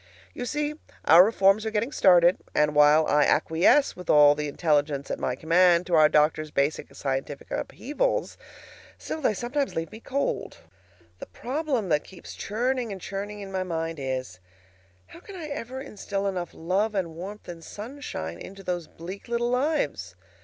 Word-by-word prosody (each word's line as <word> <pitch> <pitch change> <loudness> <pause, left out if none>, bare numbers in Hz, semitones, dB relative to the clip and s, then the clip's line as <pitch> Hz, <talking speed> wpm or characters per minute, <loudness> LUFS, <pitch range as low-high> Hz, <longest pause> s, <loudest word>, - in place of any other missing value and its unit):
You 245 - -5
see, 295 +1 -1 0.3
our 165 +3 +9
reforms 195 0 +3
are 220 - -1
getting 220 +4 -1
started; 180 - +5 0.2
and 150 0 +3
while 150 +1 +6
I 150 -1 +3
acquiesce 165 - +3
with 180 -2 -11
all 145 -1 +7
the 150 0 -3
intelligence 145 -2 0
at - - -3
my 125 - -1
command 170 +3 +3
to 175 - -5
our 155 -2 +6
doctor's 155 0 +2
basic 145 +1 -1
scientific 135 +1 -4
upheavals, 400 - -2 0.6
still, 315 - -6
they 220 -6 +1
sometimes 270 +7 -2
leave 165 -1 -3
me 220 - -10
cold. 275 +4 -3 0.6
The - - -8
problem 260 - -3
that 150 -2 +2
keeps 190 - -12
churning 240 +2 -2
and 195 - -6
churning 205 +2 -6
in 195 -1 -8
my 190 -1 -2
mind 165 -3 -3
is: 130 -8 -4 0.7
How - - -14
can 390 +2 -12
I 340 -4 -6
ever 265 -3 -5
instil 205 -6 -4
enough 180 -3 -2
love 195 +6 -1
and 175 -4 -2
warmth 195 +5 -8
and 170 -1 -9
sunshine 205 - -7
into 195 0 -10
those 175 -3 -3
bleak 185 +7 -9
little 240 0 -1
lives? 290 +5 -1
185 Hz, 165 wpm, -26 LUFS, 155-235 Hz, 0.7 s, our